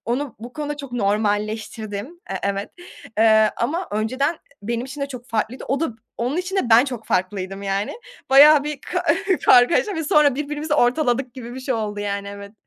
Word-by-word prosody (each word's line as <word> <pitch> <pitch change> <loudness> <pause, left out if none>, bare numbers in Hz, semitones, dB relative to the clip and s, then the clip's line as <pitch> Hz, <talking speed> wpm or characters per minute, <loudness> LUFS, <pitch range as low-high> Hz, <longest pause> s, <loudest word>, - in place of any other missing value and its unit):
Onu 250 +2 -2
bu 240 +3 -9
konuda 295 0 -4
çok 280 -3 -9
normalleştirdim. 210 0 -1 0.2
Eee, 195 - -2
evet, 200 0 -2 0.5
eee, 220 -1 +5
ama 325 +10 -2
önceden 255 +9 0 0.3
benim 235 +3 -2
için 280 +2 -8
de 280 - -1
çok 250 -2 -9
farklıydı, 225 +2 -3
o 275 +2 0
da 325 - +1 0.3
onun 250 +7 -1
için 365 +2 -3
de 250 -12 0
ben 235 +4 +7
çok 245 -5 -6
farklıydım, 190 +1 -2
yani. 195 +1 -2 0.4
Bayağı 290 +2 +8
bir 300 -2 -4
ka 360 +4 -3 0.4
kargaşa 330 - +5
ve 320 - -3
sonra 290 -2 +4
birbirimizi 295 +1 -2
ortaladık 250 -1 +1
gibi 240 -2 -8
bir 260 - -7
şey 255 -1 -2
oldu, 210 -2 -3
yani, 200 -1 -3
evet. 200 0 -9
245 Hz, 180 wpm, -22 LUFS, 210-285 Hz, 0.5 s, Bayağı